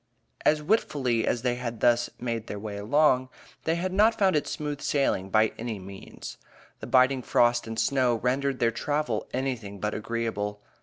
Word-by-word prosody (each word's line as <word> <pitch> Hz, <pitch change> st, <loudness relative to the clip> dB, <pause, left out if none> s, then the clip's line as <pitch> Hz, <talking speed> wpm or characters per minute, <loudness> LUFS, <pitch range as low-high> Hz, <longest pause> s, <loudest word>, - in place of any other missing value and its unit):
As 150 Hz, 0 st, +3 dB
willfully 135 Hz, -, +1 dB
as 120 Hz, -, 0 dB
they 125 Hz, -1 st, +2 dB
had 120 Hz, -2 st, -5 dB
thus 120 Hz, +1 st, +3 dB
made 115 Hz, -2 st, -3 dB
their 105 Hz, -, -5 dB
way 105 Hz, 0 st, -6 dB
along, 130 Hz, +4 st, +2 dB, 0.4 s
they 160 Hz, -, +2 dB
had 185 Hz, +2 st, -2 dB
not 220 Hz, +3 st, +4 dB
found 190 Hz, -3 st, +3 dB
it 150 Hz, -, 0 dB
smooth 150 Hz, -1 st, -4 dB
sailing 115 Hz, -9 st, 0 dB
by 110 Hz, +2 st, +3 dB
any 115 Hz, -2 st, -3 dB
means. 95 Hz, 0 st, -10 dB, 0.4 s
The 110 Hz, -, -7 dB
biting 130 Hz, +1 st, +4 dB
frost 120 Hz, -1 st, +2 dB
and 115 Hz, 0 st, -5 dB
snow 130 Hz, -2 st, +2 dB
rendered 130 Hz, +4 st, 0 dB
their 115 Hz, -1 st, +2 dB
travel 145 Hz, -2 st, -2 dB
anything 125 Hz, -7 st, -3 dB
but 105 Hz, +1 st, -2 dB
agreeable. 105 Hz, -2 st, -3 dB
120 Hz, 170 wpm, -27 LUFS, 110-140 Hz, 0.4 s, not